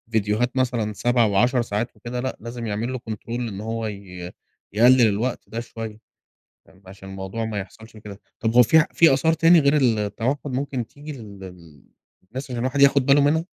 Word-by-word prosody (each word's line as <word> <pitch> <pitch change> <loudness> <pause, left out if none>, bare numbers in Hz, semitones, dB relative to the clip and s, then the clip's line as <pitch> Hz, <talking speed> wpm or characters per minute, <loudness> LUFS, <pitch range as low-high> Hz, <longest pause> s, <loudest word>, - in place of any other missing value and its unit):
ڤيديوهات 105 +3 +1
مثلًا 120 -4 0
7 120 +3 +2
و10 120 +5 +2
ساعات 115 +1 -3
وكده 125 +1 -6
لأ، 130 +1 -4
لازم 115 0 -6
يعمل 110 +5 -3
له 130 - -4
control 110 +1 -7
إن 115 -4 -4
هو 115 0 -3
ي 90 -3 -8 0.4
يقلِّل 125 +4 +6
الوقت 110 +5 -2
ده 115 - -4
شويّة، 115 -2 -7 0.7
فاهم، 95 - -23
عشان 95 0 -12
الموضوع 95 +4 -5
ما 110 -2 -3
يحصلش 110 +3 -10
كده، 105 -2 -11 0.2
طَب 115 0 -1
هو 125 - +8
في 140 +8 +5
ع 160 - +4
فيه 165 -5 +5
آثار 160 +5 +2
تاني 165 +1 +5
غير 140 +1 +3
ال 125 -6 +2
التوحد 115 +7 -2
ممكن 130 -2 -3
تيجي 145 +5 -10
لل 105 -7 -11 0.9
للناس، 130 +2 -5
عشان 125 - -4
الواحد 130 +3 -1
ياخد 140 -1 +5
باله 140 +1 +5
منها؟ 155 +3 +2
115 Hz, 190 wpm, -23 LUFS, 105-130 Hz, 0.9 s, هو